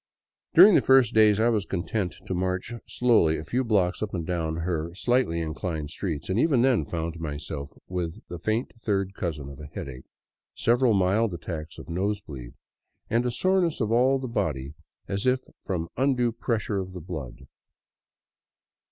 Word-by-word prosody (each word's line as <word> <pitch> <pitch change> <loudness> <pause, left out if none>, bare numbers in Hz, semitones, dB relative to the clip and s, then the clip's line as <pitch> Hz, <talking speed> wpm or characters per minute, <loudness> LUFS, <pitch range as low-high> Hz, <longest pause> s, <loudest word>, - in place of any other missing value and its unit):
During 205 - +10
the - - +6
first 130 -3 +5
days 110 -1 +5
I 115 +2 +4
was 110 -4 +1
content 95 -1 -2
to - - -3
march 90 +4 -2
slowly 110 -11 +3
a 75 - -5
few 125 +11 -1
blocks 95 -6 +1
up 105 -2 -3
and 85 -2 -3
down 80 -2 -1
her 85 0 -2
slightly 120 -6 +1
inclined 80 -1 -4
streets, 80 -5 -4
and 95 +4 0
even 135 -4 +3
then 130 -3 +3
found 85 0 -4
myself 75 -2 -5 0.2
with 90 0 -3
the 85 - -7
faint 110 +7 -1
third 100 -3 0
cousin 75 -8 -4
of 70 -1 -10
a 75 - -8
headache, 65 -2 -8 0.5
several 120 -1 +3
mild 95 +2 +2
attacks 80 -1 -6
of - - -10
nose 100 +5 -1
bleed, 65 -10 -10 0.6
and 120 +2 +2
a - - 0
soreness 180 +4 +1
of 110 -3 0
all 130 +3 +4
the 130 -1 -4
body 75 - -2 0.3
as 100 +5 -2
if 130 0 +3 0.2
from 85 -4 -3
undue 125 -2 +2
pressure 110 -3 -1
of 95 -1 -5
the 90 - -6
blood. 75 -7 -7
95 Hz, 170 wpm, -26 LUFS, 80-115 Hz, 0.6 s, During